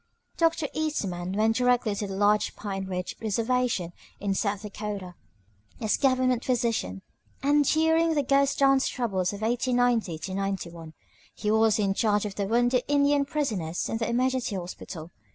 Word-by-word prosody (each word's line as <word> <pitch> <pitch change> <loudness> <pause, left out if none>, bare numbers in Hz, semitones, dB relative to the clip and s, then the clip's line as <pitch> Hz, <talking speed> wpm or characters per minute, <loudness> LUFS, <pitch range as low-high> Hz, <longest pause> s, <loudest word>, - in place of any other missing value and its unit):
Doctor 330 -2 +1
Eastman 190 - -2
went 220 +2 +2
directly 245 -3 +2
to 200 0 -3
the 195 - -5
large 205 +1 +2
Pine 195 -2 -4
Ridge 180 -1 -4
reservation 225 -4 0 0.3
in 200 -1 -1
South 200 0 -1
Dakota 205 -3 -5 0.7
as 220 -2 +1
Government 255 -2 +2
physician; 230 - -1 0.4
and 290 +1 +4
during 320 +2 +3
the 290 - +2
"Ghost 275 +1 +2
dance" 275 -1 +4
troubles 195 -7 -1
of 205 +1 -7
1890 235 -7 0
91 170 -5 -4 0.4
he 210 - -1
was 220 -1 +4
in 200 -2 +1
charge 210 0 +1
of 205 - -4
the 200 0 -2
wounded 245 +3 +2
Indian 285 0 +3
prisoners 215 - -2
in 225 - -1
their 225 - -2
emergency 255 -2 0
hospital. 175 -2 -7
220 Hz, 150 wpm, -27 LUFS, 195-255 Hz, 0.7 s, and